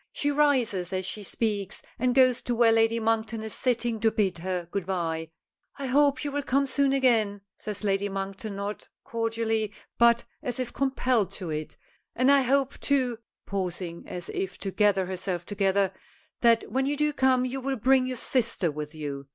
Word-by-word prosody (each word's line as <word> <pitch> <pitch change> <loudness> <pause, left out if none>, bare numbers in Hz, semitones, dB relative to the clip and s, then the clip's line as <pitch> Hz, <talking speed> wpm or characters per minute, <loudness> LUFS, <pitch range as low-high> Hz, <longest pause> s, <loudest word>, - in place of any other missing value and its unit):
She 290 - 0
rises 250 - +2
as 185 -1 -2
she 210 +3 -4
speaks, 205 -1 -2 0.2
and 250 +1 +1
goes 255 -2 +5
to 240 - -2
where 230 -1 +5
Lady 225 0 +3
Monkton 225 0 0
is 220 - -5
sitting 235 -3 0
to 225 +1 +3
bid 200 -5 0
her 180 -1 -3
good 195 -3 -3
bye. 165 -4 -2 0.5
"I 280 - -4
hope 280 0 +3
you 290 - -2
will 290 +1 -1
come 275 0 +1
soon 275 0 +1
again," 225 -7 +2 0.2
says 210 -1 -6
Lady 200 0 +1
Monkton, 195 +2 -5
not 200 +1 -5
cordially, 225 -2 -1 0.3
but 235 0 +5 0.2
as 250 -4 -3
if 250 -2 -3
compelled 255 -6 +1
to 180 -5 -5
it; 155 0 -5 0.4
"and 255 +3 +4
I 280 -1 +6
hope, 270 +1 +1
too," 255 -5 +1 0.3
pausing 180 -3 -4
as 175 -1 -6
if 190 -1 -3
to 195 - -3
gather 200 -2 +3
herself 180 -1 -3
together, 195 -1 +1 0.5
"that 230 -1 +3
when 265 +1 +1
you 290 +1 0
do 300 0 +1
come 260 -2 +3
you 260 +1 -3
will 270 +1 -2
bring 255 +3 +3
your 255 -1 -3
sister 230 - +1
with 150 +1 -6
you. 140 -3 -5
225 Hz, 185 wpm, -27 LUFS, 195-255 Hz, 0.5 s, I